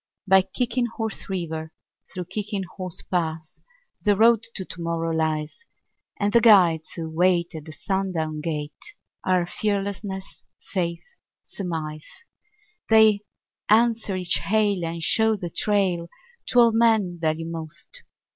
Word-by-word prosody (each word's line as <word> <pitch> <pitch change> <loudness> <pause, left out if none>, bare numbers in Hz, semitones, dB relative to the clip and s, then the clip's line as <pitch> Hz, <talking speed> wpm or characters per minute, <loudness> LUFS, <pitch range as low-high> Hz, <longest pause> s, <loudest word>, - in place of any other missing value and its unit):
By 190 0 +7
Kicking 240 +4 -1
Horse 225 -2 -4
River, 160 -4 -4 0.4
through 180 -1 -5
Kicking 200 +2 -3
Horse 185 -1 -4
Pass, 160 -3 -3 0.4
The 205 -1 +4
Road 225 +1 +5
to 190 - -4
Tomorrow 165 -1 -3
lies; 155 - -2 0.6
And 205 0 0
the 235 - +6
guides 180 -8 +5
who 165 -1 -4
wait 175 +2 +1
at 155 -2 -8
the 155 - -9
sundown 165 -3 -2
gate 155 - -5 0.3
Are 185 -2 +2
Fearlessness, 200 0 -3 0.3
Faith, 170 -3 -1 0.4
Surmise. 155 -5 -5 0.8
They 220 -2 +6 0.5
answer 225 -2 +3
each 180 -5 +1
hail 200 +2 +1
and 165 0 -3
show 220 +5 +3
the 175 -4 -6
trail 185 -5 +1 0.4
To - - -1
all 235 -1 +7
men 220 -6 +2
value 160 0 0
most. 165 - -5
185 Hz, 125 wpm, -24 LUFS, 165-210 Hz, 0.8 s, By